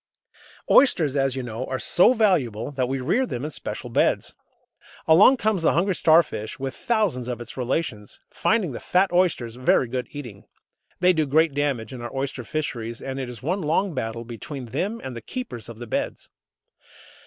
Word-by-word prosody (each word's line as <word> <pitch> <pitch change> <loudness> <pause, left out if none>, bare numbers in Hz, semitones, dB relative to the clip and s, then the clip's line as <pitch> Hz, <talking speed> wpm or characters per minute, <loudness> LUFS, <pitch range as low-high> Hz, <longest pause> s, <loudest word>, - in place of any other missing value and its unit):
Oysters, 160 - +5
as 135 -2 +1
you 130 - -3
know, 120 0 -5
are 130 - -2
so 175 - +4
valuable 150 - +1
that 130 -3 -1
we 135 0 -1
rear 220 - +1
them 125 - -4
in 155 - -4
special - - -6
"beds." - - +1 0.7
Along 195 +11 +7
comes 215 -6 0
the 165 - +3
hungry 185 +5 +2
Starfish, 155 -11 +2
with 135 0 -4
thousands 200 - 0
of 125 -1 -4
its 120 - -9
relations, 125 -4 -3
finding 215 -8 +1
the 120 - -6
fat 185 +1 +2
oysters 150 -10 +1
very 130 0 +3
good 125 +1 -3
eating. 120 -9 -9 0.6
They 180 0 +5
do 155 -3 0
great 155 +2 +3
damage 135 -6 -1
in 125 - -7
our 120 - -6
oyster 135 -1 -3
fisheries, 120 -3 -4
and 135 0 -5
it 130 -2 -4
is 120 0 -10
one 180 +7 -1
long 170 +4 0
battle 115 -3 -4
between 120 +4 -7
them 200 - -3
and 130 -2 -6
the 115 - -6
keepers 120 - -7
of 115 - -9
the 120 - -7
"beds." 110 - -4
135 Hz, 185 wpm, -24 LUFS, 120-170 Hz, 0.7 s, Along